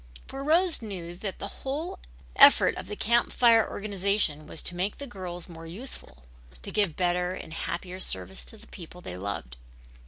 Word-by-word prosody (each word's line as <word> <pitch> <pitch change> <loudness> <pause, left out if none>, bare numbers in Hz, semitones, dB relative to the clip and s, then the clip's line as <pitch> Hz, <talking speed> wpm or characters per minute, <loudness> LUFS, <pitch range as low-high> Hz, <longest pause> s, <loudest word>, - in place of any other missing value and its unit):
For 270 +1 -6
Rose 330 +2 +3
knew 185 -6 -6
that 195 0 -4
the 200 - -4
whole 295 +6 -3 0.4
effort - - +8
of - - -6
the 210 - -4
Camp 235 +3 +2
Fire 230 -2 +5
organization 200 -7 -1
was 160 - -4
to 175 - +3
make 190 +4 -1
the 285 - -6
girls 180 -7 -6
more 165 -2 -10
useful, 170 - -7 0.4
to - - -5
give 200 -7 +1
better 180 0 +1
and 160 - -8
happier 180 +2 -4
service 95 - -1
to 220 - -11
the - - -14
people 180 -1 -11
they 90 - -6
loved. 90 -11 -5
185 Hz, 180 wpm, -28 LUFS, 170-220 Hz, 0.4 s, effort